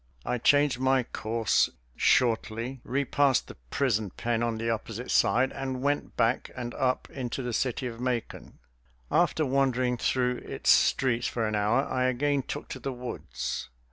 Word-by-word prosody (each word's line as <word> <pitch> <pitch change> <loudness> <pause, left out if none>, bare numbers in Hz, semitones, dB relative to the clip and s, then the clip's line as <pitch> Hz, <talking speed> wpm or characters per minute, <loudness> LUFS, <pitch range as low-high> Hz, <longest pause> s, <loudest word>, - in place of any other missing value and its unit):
I 125 - -1
changed 145 0 +3
my 130 0 +3
course, 115 -1 +1 0.3
shortly 115 +1 +1
repassed 140 0 +1
the - - -9 0.2
prison 110 - 0
pen 115 +5 -2
on 115 -1 0
the 115 +1 -3
opposite 115 +1 -3
side, 130 +3 +3
and 130 -1 -4
went 145 +1 -1
back 115 +1 +1
and 120 -1 -5
up 130 -1 0
into 130 0 -4
the 120 -1 -3
city 130 +2 -1
of 120 -1 -5
Macon. 125 -2 -3 0.5
After 155 - +2
wandering 130 -2 +1
through 125 +1 +1
its - - 0
streets 120 -3 +3
for 115 -2 -1
an 110 - -2
hour 105 +5 +2
I 130 -1 0
again 140 +3 +1
took - - -6
to 130 - -6
the 135 +2 -3
woods. 125 - -5
125 Hz, 160 wpm, -28 LUFS, 115-130 Hz, 0.5 s, changed